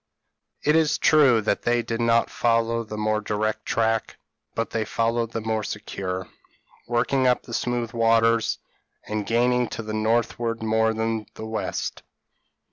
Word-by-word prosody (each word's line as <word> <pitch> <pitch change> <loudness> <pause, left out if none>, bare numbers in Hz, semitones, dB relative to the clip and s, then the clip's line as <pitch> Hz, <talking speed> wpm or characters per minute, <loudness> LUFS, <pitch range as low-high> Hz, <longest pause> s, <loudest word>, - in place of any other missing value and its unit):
It 150 - +3
is 160 -1 +3
true 135 -7 +5
that 105 -1 0
they 120 0 +1
did 115 0 -3
not 115 0 +3
follow 115 0 +1
the 110 -1 -7
more 110 0 0
direct 110 +1 -2
track, 115 -1 0 0.4
but 115 - -2
they 115 - 0
followed 115 +1 -1
the 115 - -3
more 110 0 -1
secure, 95 -3 -4 0.6
working 125 +2 +1
up 125 - +2
the 115 - -10
smooth 120 -1 -1
waters, 115 0 +3 0.5
and 105 -1 -3
gaining 125 +2 +2
to 115 - -6
the 110 0 -5
northward 115 +1 0
more 110 0 +2
than 110 -1 -1
to - - -32
the 110 - -7
west. 110 0 -3
115 Hz, 155 wpm, -24 LUFS, 110-120 Hz, 0.6 s, true